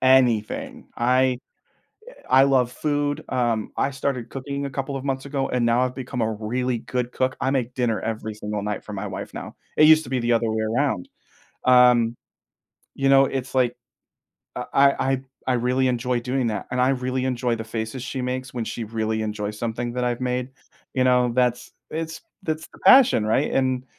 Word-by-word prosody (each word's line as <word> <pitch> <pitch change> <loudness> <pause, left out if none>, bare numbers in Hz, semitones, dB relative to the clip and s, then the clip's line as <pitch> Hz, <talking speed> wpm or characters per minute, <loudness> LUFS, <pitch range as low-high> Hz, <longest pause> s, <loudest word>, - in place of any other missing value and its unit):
anything. 125 -5 +2
I 125 +1 +2 0.7
eh, - - -12 0.2
I 135 - +6
love 130 -3 +3
food, 145 0 -1
um, 120 -4 0
I 135 - +1
started 135 -3 -3
cooking 140 +1 -4
a 140 - -5
couple 135 +1 -4
of 135 - -5
months 135 -1 -2
ago, 135 -1 -1
and 125 -2 +1
now 115 +1 +3
I've 125 0 0
become 125 -2 -4
a 110 - +1
really 120 +3 -2
good 125 +1 -3
cook. 130 +1 -1
I 130 - +1
make 125 -3 -1
dinner 120 -4 0
every 110 -1 -4
single 105 -1 -4
night 105 0 -3
for 105 - -8
my 100 +1 -4
wife 95 - -7
now. - - -7 0.2
It 155 - +7
used 160 0 +7
to 125 - -10
be 130 -2 0
the 120 +1 +1
other 115 0 +2
way 110 0 -1
around. 110 -3 0 0.6
Um, 125 -2 +5 0.8
you 135 - 0
know, 135 0 +6
it's, 135 -1 -4
like, 125 -2 +3 0.8
I - - -3
I 135 -1 +4
I 135 -1 0 0.3
I 130 - +3
really 125 +2 +1
enjoy 125 0 0
doing 125 +1 -1
that, 105 -3 -3
and 125 -1 +1
I 130 - +4
really 130 -1 -1
enjoy 125 -2 0
the 110 - -5
faces 110 +3 -4
she 130 +1 -4
makes 130 0 -4
when 120 -2 -2
she 115 - -4
really 110 0 -2
enjoys 105 -1 -4
something 120 +1 -3
that 125 0 -1
I've 120 0 -1
made. 125 0 -1 0.5
You 130 - +3
know, 125 -1 +3
that's 125 -1 +1 0.2
it's 160 +1 -4 0.2
that's 155 -2 -3
the - - -15
passion, 255 - +7
right? 120 +7 +1
And, 130 -1 0
125 Hz, 200 wpm, -23 LUFS, 115-130 Hz, 0.8 s, It